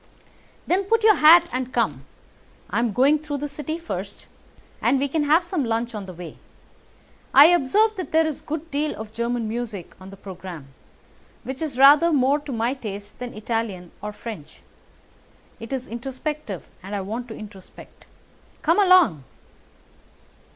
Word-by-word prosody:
"Then 380 Hz, +3 st, +1 dB
put 455 Hz, +2 st, +1 dB
on 440 Hz, -, +7 dB
your 425 Hz, -, +6 dB
hat 335 Hz, +3 st, +7 dB
and 255 Hz, 0 st, -3 dB
come. -, -, -1 dB, 0.6 s
I -, -, +1 dB
am 235 Hz, -1 st, +1 dB
going 275 Hz, +8 st, +3 dB
through 295 Hz, -1 st, -4 dB
the 295 Hz, +1 st, -4 dB
City 300 Hz, +3 st, -5 dB
first, 335 Hz, 0 st, -7 dB, 0.6 s
and 275 Hz, -, +3 dB
we 280 Hz, +2 st, 0 dB
can 295 Hz, +2 st, -1 dB
have 315 Hz, +4 st, +4 dB
some 345 Hz, -3 st, -2 dB
lunch 230 Hz, 0 st, -2 dB
on 205 Hz, -3 st, -6 dB
the 185 Hz, -, -8 dB
way. 175 Hz, -1 st, -10 dB, 1.0 s
I 290 Hz, +4 st, +10 dB
observe 415 Hz, +9 st, +2 dB
that 365 Hz, -6 st, -5 dB
there 320 Hz, 0 st, +4 dB
is 310 Hz, -3 st, -4 dB
a -, -, -28 dB
good 315 Hz, +2 st, -5 dB
deal 295 Hz, +2 st, -1 dB
of 220 Hz, 0 st, -8 dB
German 235 Hz, 0 st, -2 dB
music 220 Hz, -5 st, -5 dB
on 190 Hz, -, -10 dB
the 195 Hz, -, -12 dB
programme, 185 Hz, -7 st, -9 dB, 0.7 s
which 265 Hz, +2 st, -6 dB
is 300 Hz, -6 st, -4 dB
rather 290 Hz, +5 st, +7 dB
more 280 Hz, 0 st, +3 dB
to 290 Hz, -1 st, -8 dB
my 235 Hz, +1 st, 0 dB
taste 205 Hz, -5 st, -8 dB
than 245 Hz, -3 st, -7 dB
Italian 215 Hz, -5 st, -4 dB
or 210 Hz, -, -5 dB
French. 205 Hz, -8 st, -10 dB, 1.0 s
It 230 Hz, +1 st, -9 dB
is 260 Hz, -2 st, -3 dB
introspective, 260 Hz, -, -5 dB, 0.2 s
and 195 Hz, +2 st, -6 dB
I 200 Hz, -, -2 dB
want 225 Hz, +6 st, -5 dB
to 220 Hz, -, -8 dB
introspect. 200 Hz, -3 st, -13 dB, 0.6 s
Come 330 Hz, +5 st, +3 dB
along!" 365 Hz, -, +5 dB
255 Hz, 170 wpm, -23 LUFS, 215-305 Hz, 1.0 s, I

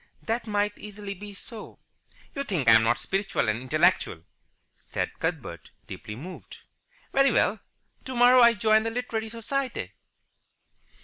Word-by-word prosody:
"That 230 Hz, +1 st, -2 dB
might 205 Hz, 0 st, -1 dB
easily 205 Hz, -1 st, -7 dB
be 205 Hz, +2 st, -10 dB
so." 220 Hz, +2 st, -10 dB, 0.6 s
"You 280 Hz, -, -3 dB
think 180 Hz, -, -2 dB
I'm 115 Hz, 0 st, +8 dB
not 120 Hz, +2 st, +2 dB
spiritual 195 Hz, -, -1 dB
and 110 Hz, +2 st, 0 dB
intellectual," 155 Hz, -, +1 dB, 0.5 s
said -, -, -5 dB
Cuthbert, -, -, -4 dB, 0.2 s
deeply 105 Hz, -, -8 dB
moved. 175 Hz, +10 st, -10 dB, 0.6 s
"Very 275 Hz, 0 st, +4 dB
well. -, -, +2 dB, 0.4 s
Tomorrow 250 Hz, 0 st, +5 dB
I 235 Hz, -1 st, +7 dB
join 215 Hz, +1 st, +4 dB
the 225 Hz, -, -2 dB
Literary 225 Hz, -2 st, -3 dB
Society." 250 Hz, +3 st, -3 dB
210 Hz, 130 wpm, -26 LUFS, 180-235 Hz, 0.6 s, I'm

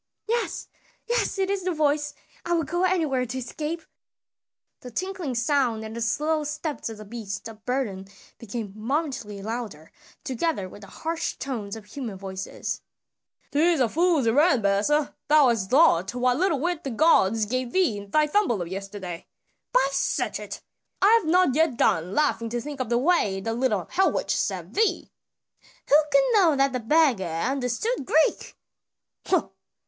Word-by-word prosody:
"Yes, 470 Hz, +1 st, -2 dB, 0.4 s
yes! 480 Hz, -3 st, 0 dB
it 385 Hz, -1 st, +1 dB
is 400 Hz, -1 st, -1 dB
the 365 Hz, 0 st, 0 dB
voice; 295 Hz, -1 st, +1 dB, 0.3 s
I 345 Hz, -, -1 dB
will 330 Hz, -1 st, +2 dB
go 350 Hz, +5 st, 0 dB
anywhere 305 Hz, -9 st, +1 dB
to 250 Hz, +3 st, -5 dB
escape." 305 Hz, +6 st, -4 dB, 1.0 s
The 250 Hz, -, -9 dB
tinkling 365 Hz, -, -3 dB
sound 240 Hz, -3 st, +1 dB
and 220 Hz, +1 st, -7 dB
the 235 Hz, -, -5 dB
slow 300 Hz, +7 st, 0 dB
steps 300 Hz, -2 st, -4 dB
of 225 Hz, -, -8 dB
the 215 Hz, -, -10 dB
beasts 210 Hz, -1 st, -6 dB
of 220 Hz, -1 st, -12 dB
burden 225 Hz, -7 st, -2 dB, 0.3 s
became 220 Hz, -3 st, -6 dB
momently 230 Hz, -4 st, -3 dB
louder, 215 Hz, -8 st, -6 dB, 0.3 s
together 265 Hz, -, -1 dB
with 205 Hz, -, -13 dB
the 200 Hz, -, -11 dB
harsh 325 Hz, -, -3 dB
tones 225 Hz, -7 st, -5 dB
of 220 Hz, -, -9 dB
a -, -, -24 dB
human 230 Hz, -4 st, -6 dB
voice. 190 Hz, 0 st, -5 dB, 0.7 s
"'Tis 325 Hz, +2 st, +3 dB
a 250 Hz, -, +4 dB
fool's 330 Hz, +1 st, +2 dB
errand, 265 Hz, -, +4 dB
Besa; 210 Hz, +10 st, +2 dB
thou 295 Hz, -3 st, +6 dB
hast 210 Hz, -5 st, -1 dB
lost 245 Hz, -, +4 dB
what 250 Hz, 0 st, +2 dB
little 340 Hz, -6 st, +2 dB
wit 345 Hz, +2 st, -2 dB
the 275 Hz, -, -3 dB
gods 225 Hz, -, +3 dB
gave 255 Hz, +2 st, -2 dB
thee 360 Hz, -, +2 dB
in 200 Hz, 0 st, -11 dB
thy 305 Hz, +7 st, +3 dB
tumble 300 Hz, -, +1 dB
of 175 Hz, -, -3 dB
yesterday. 195 Hz, -2 st, -6 dB, 0.4 s
By -, -, +4 dB
Sechet! 275 Hz, -, -2 dB, 0.4 s
I 395 Hz, -, +5 dB
have 430 Hz, -, -8 dB
not 350 Hz, -3 st, +4 dB
yet 310 Hz, -4 st, +2 dB
done 170 Hz, -1 st, +1 dB
laughing 280 Hz, -6 st, +1 dB
to 240 Hz, +1 st, -2 dB
think 285 Hz, +3 st, -7 dB
of 255 Hz, -, -2 dB
the 235 Hz, -, +2 dB
way 250 Hz, -, +2 dB
the 225 Hz, +3 st, -3 dB
little 225 Hz, -6 st, 0 dB
hell 380 Hz, +1 st, +3 dB
witch -, -, -1 dB
served -, -, -2 dB
thee!" 440 Hz, 0 st, +1 dB, 0.8 s
"Who -, -, +6 dB, 0.2 s
could -, -, +4 dB
know 360 Hz, -8 st, +5 dB
that 275 Hz, -1 st, +2 dB
the 255 Hz, -, -1 dB
beggar 255 Hz, -, +3 dB
understood 250 Hz, -, -1 dB
Greek!" 310 Hz, +5 st, +1 dB
260 Hz, 165 wpm, -25 LUFS, 220-320 Hz, 1.0 s, thou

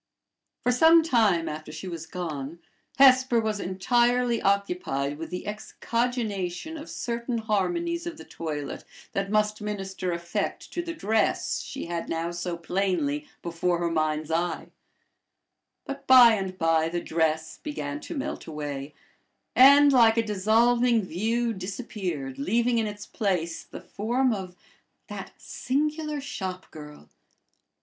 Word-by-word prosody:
For 250 Hz, -, +3 dB
some 325 Hz, +6 st, +6 dB
time 215 Hz, -, +2 dB
after 155 Hz, 0 st, -6 dB
she 160 Hz, +5 st, -7 dB
was 165 Hz, -2 st, -6 dB
gone, 160 Hz, -4 st, -5 dB, 0.4 s
Hesper 260 Hz, -2 st, +6 dB
was 215 Hz, -2 st, -1 dB
entirely 240 Hz, +5 st, +1 dB
occupied 180 Hz, -8 st, 0 dB
with 165 Hz, -, -6 dB
the 180 Hz, -, -5 dB
excogitation 220 Hz, -, -3 dB
of 310 Hz, +1 st, -8 dB
certain 235 Hz, 0 st, -3 dB
harmonies 340 Hz, -, -1 dB
of 335 Hz, -2 st, -6 dB
the -, -, -10 dB
toilet 150 Hz, -4 st, -5 dB, 0.3 s
that 195 Hz, 0 st, -1 dB
must 210 Hz, 0 st, +1 dB
minister 195 Hz, -3 st, -3 dB
effect 170 Hz, 0 st, -3 dB
to 350 Hz, -, -1 dB
the 335 Hz, -1 st, -6 dB
dress 220 Hz, -5 st, 0 dB
she 275 Hz, -, -6 dB
had 170 Hz, 0 st, -4 dB
now 165 Hz, +1 st, -2 dB
so 175 Hz, 0 st, -4 dB
plainly 195 Hz, -, -1 dB, 0.2 s
before 170 Hz, +1 st, 0 dB
her 170 Hz, 0 st, -1 dB
mind's 155 Hz, -1 st, -1 dB
eye; 170 Hz, 0 st, -1 dB, 1.2 s
but 275 Hz, 0 st, -7 dB
by 250 Hz, -3 st, +9 dB
and 190 Hz, -3 st, -3 dB
by 165 Hz, -1 st, +2 dB
the 175 Hz, +1 st, -2 dB
dress 160 Hz, -1 st, -1 dB
began 295 Hz, 0 st, -4 dB
to 320 Hz, +1 st, -7 dB
melt 280 Hz, +2 st, -4 dB
away, 145 Hz, -2 st, -5 dB, 0.6 s
and 280 Hz, +2 st, +8 dB
like 230 Hz, -3 st, +6 dB
a 230 Hz, -, +3 dB
dissolving 225 Hz, +3 st, +3 dB
view 225 Hz, +7 st, -1 dB
disappeared, 185 Hz, -, -5 dB
leaving 235 Hz, -, +1 dB
in 220 Hz, -, 0 dB
its 205 Hz, 0 st, -7 dB
place 180 Hz, -5 st, -2 dB
the -, -, -10 dB
form 240 Hz, +4 st, 0 dB
of 185 Hz, -3 st, -6 dB, 0.5 s
"that -, -, -7 dB
singular 300 Hz, +2 st, -2 dB
shop 190 Hz, -9 st, -6 dB
girl." 150 Hz, -, -11 dB
200 Hz, 135 wpm, -26 LUFS, 170-245 Hz, 1.2 s, by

